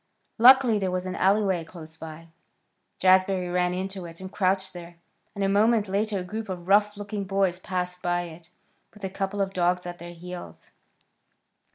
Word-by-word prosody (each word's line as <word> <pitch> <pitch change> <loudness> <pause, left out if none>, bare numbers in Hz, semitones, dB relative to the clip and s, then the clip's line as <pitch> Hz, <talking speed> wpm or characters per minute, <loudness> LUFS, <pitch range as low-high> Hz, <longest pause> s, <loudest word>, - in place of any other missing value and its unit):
Luckily 250 -2 +7
there 190 -2 -1
was 180 0 -2
an 185 - -3
alleyway 195 -3 +2
close 160 -1 -12
by. 160 0 -10 0.7
Jazbury 185 -1 +3
ran 180 0 +2
into 190 0 -4
it 165 0 -12
and 190 0 -8
crouched 190 -1 0
there, 175 -1 -10 0.4
and 200 - -2
a - - +3
moment 210 +2 +3
later 205 +2 0
a 185 - -3
group 215 +3 -6
of 180 -2 -6
rough 205 +1 +4
looking 205 0 -4
boys 190 -2 0
passed 180 -1 -3
by 175 0 0
it, 165 0 -11 0.5
with 210 - -15
a 190 - -3
couple 195 +1 -2
of 195 0 -1
dogs 180 0 +1
at 175 0 -7
their 175 +1 -9
heels. 180 +1 -10
185 Hz, 180 wpm, -26 LUFS, 175-200 Hz, 0.7 s, Luckily